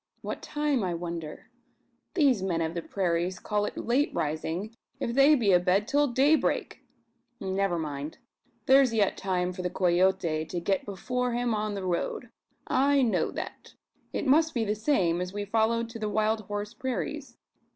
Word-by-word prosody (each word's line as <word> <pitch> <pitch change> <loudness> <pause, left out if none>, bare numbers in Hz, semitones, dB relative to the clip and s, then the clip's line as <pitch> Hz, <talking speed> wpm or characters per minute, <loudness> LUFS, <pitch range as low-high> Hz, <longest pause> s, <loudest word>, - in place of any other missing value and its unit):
What - - -5
time, 295 -5 -1
I 180 -2 -1
wonder. 170 -2 -6 0.6
These 275 - +3
men 180 -3 -1
of 160 0 -2
the 170 - -3
prairies 180 0 -1
call 210 -1 -1
it - - -6
late 260 +5 +1
rising, 160 +8 -2 0.2
if 235 - -2
they 275 +4 +6
be 225 -7 +2
abed 185 +3 +3
till 290 +1 +3
daybreak! 280 +5 +1 0.6
Never 190 -2 0
mind. 150 -1 -5 0.5
There's 265 -3 +5
yet 205 -3 +2
time 180 -1 -1
for 180 - -6
the 180 - -1
Coyote 175 -3 +1
to 175 +2 -4
get 190 +3 -1
before 250 +5 -2
him 240 -1 0
on 210 -1 -2
the 195 -1 -4
road! 185 +6 -2 0.4
I 275 +1 +3
know 230 - +1
that. - - -7 0.4
It - - -3
must 310 +3 +3
be 230 -2 +1
the 210 - 0
same 195 - +1
as 180 +1 -4
we 205 0 -3
followed 225 +2 +1
to 230 - -8
the 215 -1 -2
wild 215 +1 +1
horse 205 +1 -4
prairies. 260 +2 -4
205 Hz, 170 wpm, -28 LUFS, 180-245 Hz, 0.6 s, they